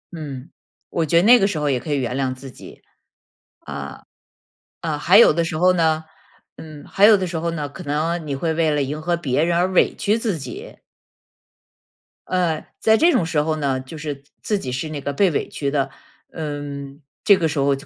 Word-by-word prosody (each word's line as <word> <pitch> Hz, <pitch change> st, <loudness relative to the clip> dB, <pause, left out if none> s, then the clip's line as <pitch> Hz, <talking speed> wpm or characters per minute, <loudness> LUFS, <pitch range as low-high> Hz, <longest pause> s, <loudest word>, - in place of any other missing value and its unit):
嗯， 140 Hz, -4 st, -8 dB, 0.4 s
我 165 Hz, -, -1 dB
觉 165 Hz, -, +3 dB
得 170 Hz, -, +5 dB
那 245 Hz, +3 st, +7 dB
个 195 Hz, -, +3 dB
时 190 Hz, -, -3 dB
候 150 Hz, -2 st, 0 dB
也 125 Hz, -, 0 dB
可 150 Hz, -, -6 dB
以 145 Hz, -, +1 dB
原 125 Hz, -1 st, -2 dB
谅 130 Hz, -1 st, -1 dB
自 135 Hz, 0 st, -11 dB
己。 -, -, -14 dB, 0.8 s
呃， -, -, -7 dB, 0.8 s
呃， 155 Hz, -3 st, -2 dB
还 180 Hz, +6 st, +4 dB
有 225 Hz, -, +8 dB
的 170 Hz, +2 st, 0 dB
时 165 Hz, -, -3 dB
候 180 Hz, +3 st, +4 dB
呢， 160 Hz, -2 st, +1 dB, 0.5 s
嗯， 155 Hz, -2 st, -11 dB
还 200 Hz, -, +2 dB
有 215 Hz, -1 st, +7 dB
的 190 Hz, -, -2 dB
时 170 Hz, -, -4 dB
候 170 Hz, +1 st, -2 dB
呢， 150 Hz, -3 st, -3 dB
可 140 Hz, -, -10 dB
能 155 Hz, +3 st, -1 dB
你 140 Hz, -, -2 dB
会 160 Hz, +4 st, -1 dB
为 160 Hz, 0 st, +1 dB
了 145 Hz, -, +1 dB
迎 145 Hz, +3 st, -4 dB
合 170 Hz, +2 st, 0 dB
别 150 Hz, -3 st, 0 dB
人 170 Hz, 0 st, +1 dB
而 175 Hz, +1 st, +3 dB
委 185 Hz, -, +2 dB
屈 210 Hz, +3 st, 0 dB
自 220 Hz, -7 st, -2 dB
己。 130 Hz, -4 st, -9 dB, 1.5 s
呃， 175 Hz, -4 st, 0 dB
在 220 Hz, -, +4 dB
这 340 Hz, +2 st, +5 dB
种 170 Hz, -, +2 dB
时 160 Hz, -2 st, +1 dB
候 155 Hz, +1 st, -1 dB
呢， 140 Hz, -3 st, -1 dB
就 130 Hz, +5 st, -10 dB
是 150 Hz, -1 st, -4 dB
自 140 Hz, +1 st, -23 dB, 0.2 s
自 205 Hz, -, +2 dB
己 130 Hz, -6 st, -5 dB
是 130 Hz, +5 st, -3 dB
那 150 Hz, -2 st, -5 dB
个 140 Hz, -, -3 dB
被 190 Hz, +7 st, +3 dB
委 145 Hz, -, -2 dB
屈 140 Hz, -, -3 dB
的。 140 Hz, -2 st, 0 dB, 0.4 s
嗯， 145 Hz, -2 st, -6 dB, 0.2 s
这 200 Hz, -3 st, +6 dB
个 165 Hz, -, +1 dB
时 150 Hz, -2 st, -2 dB
候 140 Hz, 0 st, +2 dB
就 135 Hz, +4 st, -11 dB
155 Hz, 235 characters per minute, -21 LUFS, 140-170 Hz, 1.5 s, 有